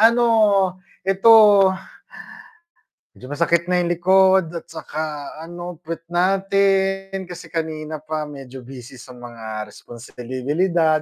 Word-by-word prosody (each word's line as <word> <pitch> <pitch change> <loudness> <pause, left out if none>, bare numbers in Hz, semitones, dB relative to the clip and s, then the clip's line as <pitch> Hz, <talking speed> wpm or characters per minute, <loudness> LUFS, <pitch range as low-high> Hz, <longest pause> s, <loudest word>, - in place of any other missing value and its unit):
ano, 235 +2 +5 0.8
eto 195 +4 +3 1.9
medyo - - -13
masakit 170 +4 0
na 180 0 +1
yung 175 - -1
likod 185 0 +3
at 170 - -8
saka 155 -2 -6
ano 175 0 -8
puwet 165 0 -7
natin, 195 +1 +1
kasi 175 0 -10
kanina 155 -2 -4
pa 155 +1 -5
medyo 135 -2 -10
busy 125 0 -11
sa 125 +1 -13
mga 110 -3 -7
responsibilidad 140 - -2
165 Hz, 110 wpm, -21 LUFS, 140-185 Hz, 1.9 s, ano